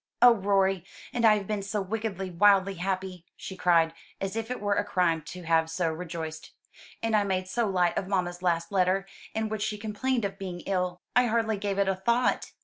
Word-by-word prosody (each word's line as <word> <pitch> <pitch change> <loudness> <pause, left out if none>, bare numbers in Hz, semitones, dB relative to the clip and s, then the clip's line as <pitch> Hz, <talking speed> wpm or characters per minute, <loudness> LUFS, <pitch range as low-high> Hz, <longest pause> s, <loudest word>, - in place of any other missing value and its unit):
"Oh, 245 0 +8
Rorie, 195 -3 +1 0.3
and 235 -1 +1
I 215 -1 +7
have 200 - -5
been 210 0 -2
so 205 +2 -2
wickedly, 195 -2 -3
wildly 195 +2 +4
happy!" 185 -1 -3
she 190 - -7
cried, 165 -3 +3 0.3
as 195 +1 -3
if 225 0 -3
it 250 - -3
were 205 0 +1
a 205 - +1
crime 175 -5 +1
to 180 -1 -8
have 160 -1 +2
so 165 0 0
rejoiced. 160 -1 -6 0.5
"And 225 -1 +1
I 210 - +4
made 185 -2 -1
so 230 +4 0
light 180 -3 +2
of 185 - -6
mamma's 180 -2 -1
last 170 -2 0
letter, 190 0 +2 0.3
in 220 0 0
which 215 -1 -4
she 210 0 -1
complained 225 +3 -1
of 195 0 -5
being 180 -3 -5
ill. 180 -2 -2
I 250 0 +5
hardly 220 -2 +1
gave 200 -1 -2
it 200 -1 +2
a 195 - +3
thought." 235 +6 +1
195 Hz, 210 wpm, -28 LUFS, 180-210 Hz, 0.5 s, Oh